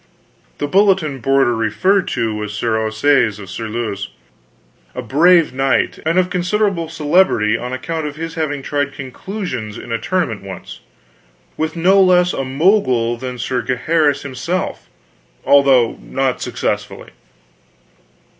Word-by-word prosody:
The - - -2
bulletin 185 -4 +2
boarder 135 -1 +2
referred 190 - +1
to 115 -1 -1
was 105 -1 -5
Sir 110 +1 -1
Ossaise 110 +1 +2
of 100 -3 -10
Surluse, 110 -2 -4 0.9
a 125 - -4
brave 165 +5 +4
knight, 135 0 0
and 165 +2 +1
of 185 0 +2
considerable 180 -2 0
celebrity 155 - +2
on 125 +2 -4
account 155 +4 -3
of 145 - -7
his 165 +1 -5
having 150 -4 -3
tried 145 0 -2
conclusions 135 - -6
in 120 - -9
a 115 - -1
tournament 135 - -1
once, 95 -2 -9 0.8
with 160 +1 -2
no 190 +4 +4
less 180 -1 +4
a 135 - -2
Mogul 130 - +2
than 125 +1 -6
Sir 125 +1 -2
Gaheris 145 +3 +1
himself 155 +7 -4 0.6
although 135 -4 +4
not 135 -1 -2
successfully. - - -3
140 Hz, 130 wpm, -18 LUFS, 120-170 Hz, 0.9 s, brave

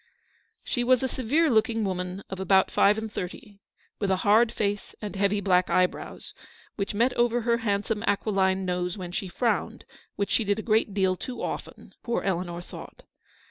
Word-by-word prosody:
She 245 - -1
was 255 +1 +3
a - - +2
severe 265 +7 +1
looking 225 0 +2
woman 185 0 -3
of 190 - -6
about 190 0 +3
five 205 +2 +4
and 220 -1 -5
thirty, 195 +3 -7 0.4
with 200 - 0
a 190 - +3
hard 220 +3 +5
face, 205 -1 -2
and 210 -2 -6
heavy 200 +1 +1
black 185 -2 +3
eyebrows, 180 0 -1 0.4
which 200 0 -3
met 240 +4 +2
over 240 0 +2
her 235 0 +2
handsome 210 0 -1
aquiline 195 -2 +1
nose 180 +1 -2
when 180 -2 -6
she 190 +2 -3
frowned, 230 +6 -1 0.3
which 200 - -2
she 230 - +3
did 205 0 0
a 220 - -4
great 215 -2 +1
deal 190 -2 +2
too 245 +6 -6
often, - - -6
poor 235 - -2
Eleanor 175 -2 -2
thought. - - -11
205 Hz, 180 wpm, -27 LUFS, 190-225 Hz, 0.4 s, hard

